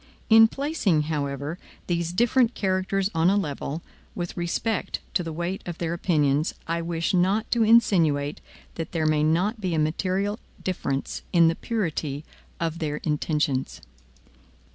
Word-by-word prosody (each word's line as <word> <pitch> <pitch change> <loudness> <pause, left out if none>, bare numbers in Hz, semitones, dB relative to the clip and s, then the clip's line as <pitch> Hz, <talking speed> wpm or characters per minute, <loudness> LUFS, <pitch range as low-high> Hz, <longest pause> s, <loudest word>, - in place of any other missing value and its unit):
In 225 0 +9
placing, 250 - 0
however, 145 +2 -3 0.3
these 170 -1 -1
different 240 +5 +3
characters 190 +1 0
on 165 +2 +3
a 200 - +3
level, 150 -2 -3 0.3
with 175 -1 -4
respect 180 +5 -1
to - - +2
the 165 -2 -4
weight 175 +4 -3
of 175 -1 -5
their 170 -1 -2
opinions, 150 -4 +1
I 170 +1 -1
wish 165 +1 -1
not 190 +4 +2
to 235 - +2
insinuate 170 -11 +3 0.4
that 165 - -7
there 160 -2 0
may 155 -1 +3
not 180 +9 +1
be 180 -4 -1
a - - 0
material 185 +7 0 0.2
difference 140 -7 -2
in 170 -2 +6
the 165 - 0
purity 160 - -3 0.3
of 165 0 -2
their 150 -3 -2
intentions. 150 -3 -1
170 Hz, 145 wpm, -25 LUFS, 155-195 Hz, 0.4 s, In